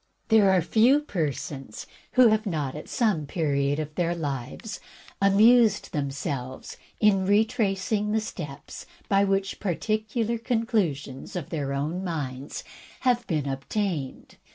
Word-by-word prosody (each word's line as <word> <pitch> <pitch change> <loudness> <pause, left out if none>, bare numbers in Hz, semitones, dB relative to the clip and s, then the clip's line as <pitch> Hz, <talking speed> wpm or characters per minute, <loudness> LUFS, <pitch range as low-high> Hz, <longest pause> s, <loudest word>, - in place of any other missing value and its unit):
There 220 -3 +6
are 185 -3 +4
few 240 - +4
persons 145 - -4 0.3
who 255 -2 +7
have 215 0 +1
not, 150 -7 -2
at 150 - -8
some 205 - +1
period 140 -3 0
of 155 -1 -4
their 175 +1 0
lives, 145 - -5 0.4
amused 215 +2 +5
themselves 140 -2 -4 0.2
in 195 -3 +3
retracing 210 -1 +1
the 220 - +2
steps 150 -10 -7 0.2
by 195 0 +4
which 195 0 -1
particular 215 +4 -1
conclu 225 - +1
sions 135 +2 -10
of 175 -6 -5
their 145 -4 -2
own 155 +7 -2
minds 145 -6 -4 0.4
have 245 -2 +1
been 150 -5 -1
attained. 140 +1 -3
185 Hz, 130 wpm, -26 LUFS, 145-215 Hz, 0.4 s, who